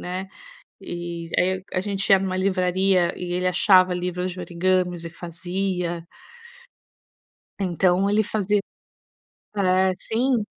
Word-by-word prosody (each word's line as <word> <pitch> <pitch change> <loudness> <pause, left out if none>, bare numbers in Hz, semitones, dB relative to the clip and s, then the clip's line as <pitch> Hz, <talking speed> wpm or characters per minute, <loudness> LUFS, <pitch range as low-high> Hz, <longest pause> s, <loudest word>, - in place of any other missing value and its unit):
né, 185 +2 -4 0.5
e 170 -1 -6
aí 185 +1 +1
a 185 - +2
gente 195 0 -1
ia 195 - +8
em 195 - -3
uma 185 -1 -2
livraria, 185 -1 +2
e 175 -1 -4
ele 180 0 0
achava 185 0 +5
livros 180 0 -2
de 180 - -8
origamis 180 -1 0
e 165 - -6
fazia. 175 0 -3 1.5
Então, 185 0 +2
ele 210 +2 +3
fazia 205 -1 0 1.0
é, 185 -1 +3
sim. 240 0 0
185 Hz, 125 wpm, -23 LUFS, 175-195 Hz, 1.5 s, ia